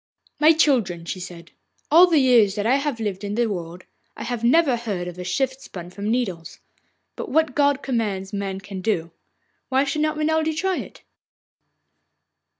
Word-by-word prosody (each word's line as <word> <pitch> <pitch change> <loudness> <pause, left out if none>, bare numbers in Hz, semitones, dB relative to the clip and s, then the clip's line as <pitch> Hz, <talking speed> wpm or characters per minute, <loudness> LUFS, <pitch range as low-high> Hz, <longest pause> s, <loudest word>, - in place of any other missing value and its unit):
'My 310 +2 +7
children,' 235 - +1
she 185 - -5
said, 175 -2 -10 0.4
'all 345 +4 +8
the 335 -3 +3
years 240 -7 +4
that 205 -1 -2
I 255 +4 +4
have 280 -4 -2
lived 205 -3 -3
in 205 0 -3
the 240 +1 +2
world, 175 -4 -5 0.3
I - - -6
have 235 -1 -4
never 270 +2 +4
heard 205 -7 -4
of 180 0 -8
a - - -4
shift 260 +9 -1
spun 175 -1 -9
from 200 +3 -4
nettles. 195 -9 -2 0.6
But - - -6
what 315 0 +2
God 285 -1 +2
commands, 210 -6 -2
man 195 -1 -3
can 195 -1 -7
do. 175 -5 -1 0.6
Why 265 +1 +3
should 285 +2 -2
not 310 0 0
Renelde 315 0 0
try 380 +2 0
it? - - -8
230 Hz, 175 wpm, -23 LUFS, 190-285 Hz, 0.6 s, all